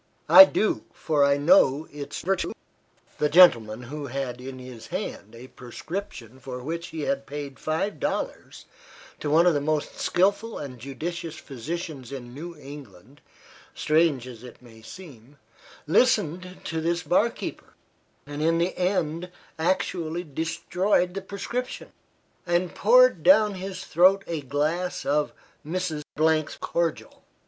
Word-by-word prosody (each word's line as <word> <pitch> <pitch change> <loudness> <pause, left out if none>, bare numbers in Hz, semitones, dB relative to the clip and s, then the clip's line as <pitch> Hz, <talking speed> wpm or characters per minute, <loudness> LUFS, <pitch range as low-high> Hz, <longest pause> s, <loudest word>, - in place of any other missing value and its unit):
"I 285 - +12
do, 215 -6 -1
for 150 -3 0
I 140 0 +4
know 150 -1 +4
its 145 -1 -7
virtue." 190 0 -1 0.7
The 150 - +2
gentleman, 120 -10 +5
who 145 +4 -6
had 125 -1 -4
in 130 0 -8
his 125 -3 -10
hand 170 - -6
a 125 +3 -11
prescription 130 - -8
for 130 -1 -7
which 170 +4 -4
he 160 - -6
had 140 -1 -2
paid 145 -1 -7
five 160 +6 -2
dollars - - -4 0.5
to 150 - -3
one 160 +4 +5
of 175 - +5
the 145 - 0
most 150 0 -2
skilful 200 +5 +1
and 130 -4 -7
judicious 160 +6 -5
physicians 145 -1 -6
in 120 -3 -8
New 165 +4 -8
England, 135 -4 -13 0.5
strange 155 -5 +2
as 120 -2 -11
it 125 -2 -12
may 115 -3 -16
seem, 140 -2 -13 0.5
listened 185 -2 +1
to 160 -1 -3
this 170 +2 -1
bar 180 +8 +3
keeper, - - -8 0.5
and 145 +1 -6
in 165 +1 +2
the 170 +2 0
end 180 -2 -1 0.3
actually 170 -1 -1
destroyed 180 +4 0
the 195 - -4
prescription, 235 +6 -5 0.6
and 175 +1 0
poured - - +5
down 215 -7 +5
his 185 -1 -6
throat 185 +4 +4
a 165 -3 -3
glass 150 +5 -2
of 145 +2 +1 0.3
"Mrs. 165 -1 -3 0.2
's 155 0 +1
Cordial." 170 -2 -3
155 Hz, 140 wpm, -25 LUFS, 140-180 Hz, 0.7 s, I